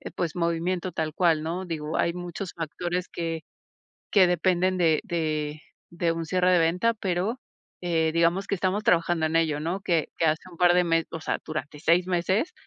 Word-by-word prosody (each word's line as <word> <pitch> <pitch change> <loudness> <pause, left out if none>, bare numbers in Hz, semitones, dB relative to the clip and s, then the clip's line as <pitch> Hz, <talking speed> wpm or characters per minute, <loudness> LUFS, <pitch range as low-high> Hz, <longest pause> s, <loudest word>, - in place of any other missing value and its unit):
pues, 170 -2 -2
movimiento 175 +2 -1
tal 155 -1 -2
cual, 165 -2 +2
¿no? 175 +4 -3
Digo, 155 -3 -4
hay 170 - +1
muchos 175 +1 -6
factores 175 +2 -3
que 165 -1 -3 0.7
que 195 -3 +6
dependen 185 +1 +2
de 160 -3 +3
de 155 -5 -2 0.3
de 170 -1 0
un 165 0 -3
cierre 180 +2 +2
de 180 - +5
venta, 180 +8 +2
pero, 200 +4 -2 0.4
eh, 165 -2 +1
digamos 170 +4 +2
que - - 0
estamos 190 +2 0
trabajando 170 -2 +2
en 155 - -3
ello, 160 -3 +2
¿no? 170 +6 -2
Que 170 -5 0
que 165 - +1
hace 155 0 +1
un 170 - -14
par 175 -1 +5
de 180 0 +4
me 165 -1 +2
o 165 - -6
sea, - - -2
durante 150 -1 -5
6 170 +3 +3
meses. 185 - 0
170 Hz, 190 wpm, -26 LUFS, 160-180 Hz, 0.7 s, que